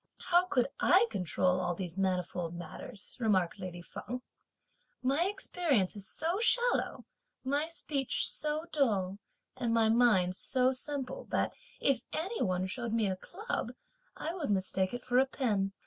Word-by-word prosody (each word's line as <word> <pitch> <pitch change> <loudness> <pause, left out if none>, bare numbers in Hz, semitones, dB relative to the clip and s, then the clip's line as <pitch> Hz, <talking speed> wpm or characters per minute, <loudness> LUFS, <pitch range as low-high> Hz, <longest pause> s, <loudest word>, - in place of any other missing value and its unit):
"How 350 +1 +6
could 250 -7 +2
I 385 +6 +6
control 180 0 +1
all 175 -1 -1
these 180 -3 -5
manifold 180 -3 -1
matters," 200 +4 -8
remarked 190 -7 +1
lady 175 -1 -6
Feng; 250 +7 -6 0.8
"my 275 +7 +3
experience 330 - +1
is 200 -2 -7
so 340 +5 -1
shallow, 485 +1 +2 0.4
my 285 +4 +1
speech 290 -5 -1
so 305 +1 -1
dull 205 -9 +1 0.4
and 235 -2 -1
my 225 -1 +4
mind 215 -6 +4
so 255 +5 +2
simple, 280 - -3
that - - 0 0.3
if 270 -4 +3
any 380 +9 -2
one 185 0 +1
showed 230 +4 -3
me 225 -2 +2
a 190 -1 0
club, 385 - -4 0.4
I 325 - -3
would 335 - -3
mistake 190 -1 +1
it 245 0 -5
for 250 0 +3
a 265 - +4
pin. 210 -8 0
240 Hz, 150 wpm, -32 LUFS, 185-295 Hz, 0.8 s, How